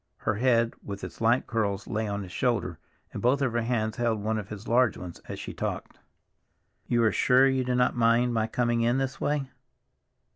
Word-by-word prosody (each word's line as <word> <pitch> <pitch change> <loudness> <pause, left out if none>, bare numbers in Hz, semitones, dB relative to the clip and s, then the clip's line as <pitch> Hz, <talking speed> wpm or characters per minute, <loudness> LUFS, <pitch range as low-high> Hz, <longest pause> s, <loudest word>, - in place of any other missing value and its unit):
Her 110 - -1
head, 115 0 +2
with 100 -1 -7
its - - -8
light 115 +3 +3
curls, 100 -4 -1
lay 110 0 -2
on 100 0 -3
his 90 - -10
shoulder, 115 - -1 0.3
and - - -5
both 125 +3 +3
of 125 -3 0
her 120 - +1
hands 110 -1 -1
held 115 -3 0
one 110 +1 -1
of 100 - -8
his 105 +1 -8
large 120 -2 +3
ones 90 -2 -9
as - - -6
she - - -6
talked. - - -5 0.9
"You 120 -1 +2
are 110 - +4
sure 130 +2 +4
you 130 -1 +1
do 125 0 -1
not 125 0 +2
mind 120 +1 +3
my 110 -1 +1
coming 120 0 0
in 120 +2 +2
this 135 -1 -3
way?" 145 -2 0
115 Hz, 210 wpm, -27 LUFS, 110-125 Hz, 0.9 s, are